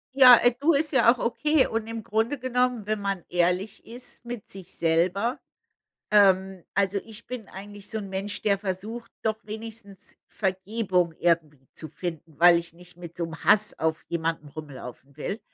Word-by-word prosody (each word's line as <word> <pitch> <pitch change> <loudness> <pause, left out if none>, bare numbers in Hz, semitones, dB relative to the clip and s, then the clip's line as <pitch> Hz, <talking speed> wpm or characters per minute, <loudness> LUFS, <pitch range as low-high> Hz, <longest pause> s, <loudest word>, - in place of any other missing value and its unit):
Ja, 255 -2 +10
äh, 245 - +6
du 315 +3 +4
ist 300 +2 +1
ja 260 -5 +5
auch 250 - -13
okay 300 +4 +2
und 225 0 -3
im 225 -1 -5
Grunde 225 +7 0
genommen, 250 -3 0
wenn 215 0 -1
man 195 -3 -2
ehrlich 180 +4 0
ist 245 +1 -10
mit 240 -3 -7
sich 190 -3 -10
selber, 180 +8 +1 0.7
ähm 190 -3 +4
also, 200 0 +1
ich 225 +1 -12
bin 245 -5 -6
eigentlich 205 +1 -10
so 220 - -3
'n 200 -2 -6
Mensch, 195 +2 -3
der 200 -2 +2
versucht 210 +4 -5
doch 220 -1 0
wenigstens 215 -2 -9
Vergebung 190 -3 -1
irgendwie 155 -6 0
zu 155 - -7
finden, 160 -1 -7
weil 175 -1 +8
ich 170 -1 -7
nicht 175 +1 -15
mit 170 -1 -10
so 170 - -1
'n 160 -1 -7
Hass 215 0 +4
auf 160 0 -1
jemanden 165 -3 -2
rumlaufen 140 -2 -10
will. 205 +4 -4
200 Hz, 175 wpm, -26 LUFS, 175-225 Hz, 0.7 s, Ja